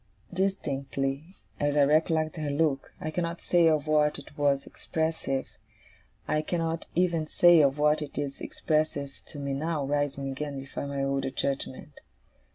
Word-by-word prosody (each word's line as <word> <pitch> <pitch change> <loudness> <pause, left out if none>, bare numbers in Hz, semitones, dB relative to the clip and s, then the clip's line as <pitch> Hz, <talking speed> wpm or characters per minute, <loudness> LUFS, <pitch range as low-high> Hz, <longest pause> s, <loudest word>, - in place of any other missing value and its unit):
Distinctly 140 -4 -2 0.2
as 145 0 +1
I 145 - +6
recollect 155 +2 +2
her 150 -2 -2
look, 145 -2 0
I 155 - -3
cannot 170 +1 -2
say 175 -2 +4
of 155 -2 +2
what 150 -1 +3
it 145 0 -12
was 140 -2 +2
expressive, 160 -4 -2 0.8
I 155 - +1
cannot 165 0 -2
even 170 -3 +2
say 175 0 +6
of 140 0 +3
what 150 +1 +3
it 150 - -6
is 140 -1 -3
expressive 155 -3 -1
to - - -10
me 140 -1 -2
now, 150 +1 -1
rising 140 -1 -1
again 140 +1 -4
before 135 +1 -5
my 140 -1 -2
older 135 0 0
judgement. 135 +1 -4
150 Hz, 155 wpm, -28 LUFS, 140-160 Hz, 0.8 s, I